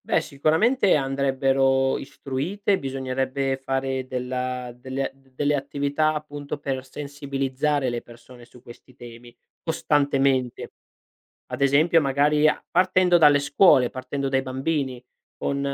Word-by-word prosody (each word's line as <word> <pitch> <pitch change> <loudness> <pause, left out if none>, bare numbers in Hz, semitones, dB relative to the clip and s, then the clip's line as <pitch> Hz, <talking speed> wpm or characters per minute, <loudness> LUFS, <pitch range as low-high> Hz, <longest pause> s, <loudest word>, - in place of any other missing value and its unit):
Beh, - - +2
sicuramente 185 - +2
andrebbero 135 -1 +1
istruite, 155 +9 -2
bisognerebbe 135 0 -2
fare 135 -1 -3
della 125 0 -4
delle 130 +2 -4
d 135 0 -28
delle 145 +2 +1
attività 145 +2 0
appunto 145 -1 -6
per 135 -2 -4
sensibilizzare 140 0 -2
le 120 0 -3
persone 120 +1 -15
su 125 0 -19
questi 120 +2 -15
temi 120 -1 -12 0.3
costantemente. 140 -5 0 0.8
Ad - - -6
esempio 145 +5 +4
magari 150 +1 +2
a 150 - +2
partendo 185 0 +4
dalle 145 -3 +6
scuole 140 -3 +4
partendo 135 +1 -4
dai 135 0 +1
bambini 130 -1 -3 0.3
con 140 - -2
135 Hz, 120 wpm, -24 LUFS, 130-145 Hz, 0.8 s, dalle